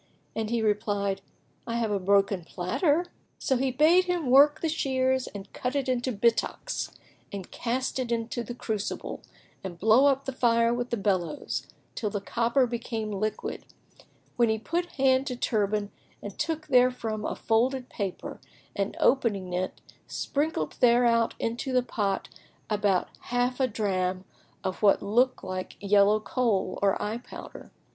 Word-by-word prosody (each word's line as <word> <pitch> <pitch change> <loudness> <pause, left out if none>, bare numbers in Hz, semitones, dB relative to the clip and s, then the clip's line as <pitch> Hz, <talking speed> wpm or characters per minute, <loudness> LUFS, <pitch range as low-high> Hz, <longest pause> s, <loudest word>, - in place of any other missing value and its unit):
and 220 -1 -2
he 235 -1 0
replied, 205 -2 0 0.5
"I 230 - -2
have 230 -2 0
a 200 - +1
broken 195 -1 +2
platter." 290 - 0 0.3
So 265 - 0
he 260 +1 +1
bade 315 +8 +5
him 350 -8 -1
work 285 +3 +6
the 330 - +1
shears[FN#13] 260 -4 +1
and 200 -1 -9
cut 250 +2 -3
it 275 -2 0
into 255 0 0
bittocks 235 - 0 0.4
and 195 -3 -7
cast 255 +2 -2
it 245 -2 -2
into 230 +1 -1
the 240 +2 -7
crucible 215 -4 -4 0.4
and 180 -3 -6
blow 220 +9 +5
up 275 -1 +2
the 270 - -2
fire 235 -2 +3
with 245 +1 -2
the 235 - -1
bellows, 195 - -1 0.3
till 215 - -2
the 205 - -2
copper 235 +5 +1
became 230 -2 -4
liquid, 215 +2 -3 0.7
when 235 -2 +4
he 220 - +2
put 340 +10 -2
hand 265 0 +3
to 250 - -2
turband 210 -3 0 0.3
and 205 -1 -9
took 320 -1 -2
therefrom 250 -5 +2
a - - -2
folded 250 +3 +1
paper 195 -4 -5 0.4
and 200 0 -2
opening 205 -8 +2
it, 185 +1 -3 0.3
sprinkled 280 - -2
thereout 235 -1 +4
into 235 +4 -2
the 250 -1 +3
pot 205 -5 -1 0.4
about 205 -3 +1 0.2
half 245 +1 0
a 260 - +3
drachm 190 -4 -1 0.4
of 185 0 -2
somewhat 220 +5 +3
like 185 -1 -5
yellow 205 +1 +4
Kohl 215 -4 0
or 200 -1 +3
eyepowder. 220 +4 -7
230 Hz, 150 wpm, -27 LUFS, 200-255 Hz, 0.7 s, work